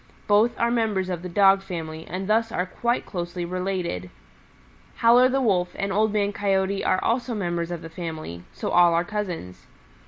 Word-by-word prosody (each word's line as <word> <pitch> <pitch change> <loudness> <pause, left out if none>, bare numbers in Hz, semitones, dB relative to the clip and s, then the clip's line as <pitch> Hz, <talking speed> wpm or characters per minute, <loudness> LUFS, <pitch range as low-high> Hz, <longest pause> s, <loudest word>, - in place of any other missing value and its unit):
Both 215 +3 +3
are 235 0 +2
members 215 -6 0
of 175 -2 -3
the 180 - -6
Dog 195 +1 +5
family 160 -4 -6
and 185 +2 -4
thus 225 +1 +2
are 180 - -1
quite 235 +6 -1
closely 175 -1 -4
related. 180 - -3 0.9
Howler 245 +2 +5
the 270 +1 +1
Wolf 180 -5 +1
and 195 0 -2
Old 215 +2 +2
Man 205 -1 0
Coyote 195 -1 0
are 185 - +2
also 240 0 0
members 175 -4 -2
of 175 -2 -5
the - - -6
family, 160 - -6
so - - -4
all 175 -1 +5
are 170 +1 +1
cousins. 180 - -5
190 Hz, 180 wpm, -24 LUFS, 175-215 Hz, 0.9 s, Dog